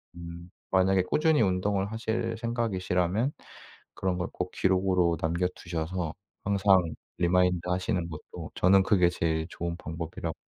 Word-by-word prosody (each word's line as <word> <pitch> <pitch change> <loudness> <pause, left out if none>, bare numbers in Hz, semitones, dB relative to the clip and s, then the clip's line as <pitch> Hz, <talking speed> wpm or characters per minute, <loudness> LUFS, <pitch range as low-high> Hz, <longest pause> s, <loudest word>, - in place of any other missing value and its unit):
음 85 +1 -9 0.2
만약에 95 0 +4
꾸준히 155 - +3
운동을 95 +2 0
하실 115 0 -2
생각이시라면 110 - 0 0.6
그런 95 -2 -1
걸 90 +2 -2
꼭 90 0 -3
기록으로 90 -3 +2
남겨 85 +3 +1
두셔서 85 -1 -3 0.3
항상 100 -2 +4 0.4
리마인드하시는 90 +1 +1
것도 75 -1 -8
저는 95 +1 +5
그게 90 -4 +4
제일 80 -1 -1
좋은 85 0 -4
방법이라고 80 0 -5
90 Hz, 315 characters per minute, -28 LUFS, 85-95 Hz, 0.6 s, 저는